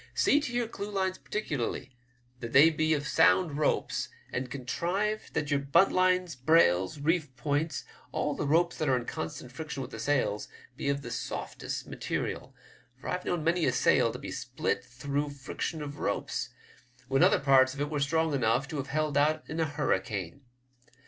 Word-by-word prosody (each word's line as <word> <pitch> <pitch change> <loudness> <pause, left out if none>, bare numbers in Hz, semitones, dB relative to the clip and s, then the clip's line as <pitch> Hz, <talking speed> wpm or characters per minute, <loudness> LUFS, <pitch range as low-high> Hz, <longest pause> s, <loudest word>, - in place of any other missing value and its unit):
See 290 - +4
to 285 - -4
your 240 -1 0
clewlines 200 -3 -2
particularly, 145 - -3 0.5
that 115 -2 -6
they 150 +5 +8
be 155 -1 +1
sound 150 +1 +3
ropes, 150 - 0 0.2
and 125 0 -2
contrive 180 - -2
that 150 0 -1
your 140 - +3
buntlines, 180 +3 +3
brails, 125 - +3
reef 155 -2 0
points 145 +5 -1
— - - -27
all 150 - -1
the 145 - -3
ropes 170 +4 +2
that 155 -3 +1
are 130 - +4
in 120 - -4
constant 80 +9 -5
friction 140 0 -6
with 130 - -9
the - - -7
sails 130 -8 0
— 125 - -23
be 140 - -2
of 140 0 -1
the - - -6
softest - - -4
material, - - -4 0.4
for - - -6
I've 180 - -2
known 175 -3 -1
many 170 +2 +2
a - - +3
sail - - +3
to - - -6
be - - -7
split - - -2
through 140 +3 -3
friction 145 +3 -4
of 145 0 -7
ropes, - - -2 0.6
when 135 +1 +2
other - - +5
parts 135 -1 +5
of - - -9
it 145 +1 -2
were 150 - -1
strong 160 +2 +1
enough 125 0 +1
to 155 - -4
have 140 - -3
held 150 0 0
out 155 +2 +1
in 160 - -4
a 165 - +3
hurricane. 110 - -2
145 Hz, 180 wpm, -29 LUFS, 130-165 Hz, 0.6 s, they